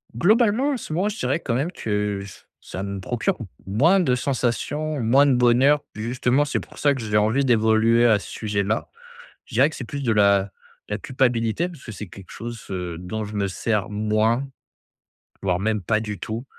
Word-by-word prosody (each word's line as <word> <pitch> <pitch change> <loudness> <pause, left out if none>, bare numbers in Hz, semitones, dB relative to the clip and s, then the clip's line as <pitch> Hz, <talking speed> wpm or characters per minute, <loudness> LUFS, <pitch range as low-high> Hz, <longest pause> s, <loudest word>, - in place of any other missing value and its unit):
Globalement, 225 - +3
en 265 - -1
ce 155 - -7
moment, 190 +5 +1
je 215 - -6
dirais - - 0
quand 120 -7 -2
même 150 +8 -1
que 105 - -2
ç 100 - -13 0.2
ça 95 - -6
me 100 0 -4
procure 125 - -1 0.3
moins 155 - +4
de 130 -8 +2
sensations, 140 +4 -1
moins 130 +6 +5
de 140 - +4
bonheur. 125 +4 +4
Justement 125 +5 +1
c'est 140 - -2
pour - - -15
ça 145 -1 +3
que 130 - -5
j'ai 105 -1 0
envie 110 +7 +2
d'évoluer 115 0 +4
à 110 -3 +5
ce - - -10
sujet-là. 105 0 -2 0.6
Je 125 - -12
dirais 135 +6 +4
que - - -9
c'est 125 - -6
plus 140 +2 -5
de 115 -3 +1
la 100 -2 +3 0.4
de - - 0
la - - -3
culpabilité 125 - 0
parce 160 -6 -13
que 115 - -9
c'est 105 0 -7
quelque 95 +1 -13
chose, 115 -1 -7
heu, 90 -3 -4
dont 105 +5 -4
je 105 +1 -8
me 100 -1 0
sers 105 +1 -1
moins, 110 +5 +1 1.0
voire 90 -2 0
même, 105 0 0
pas 110 +5 +1
du 105 -2 -5
tout 115 +4 -5
115 Hz, 205 wpm, -23 LUFS, 105-140 Hz, 1.0 s, moins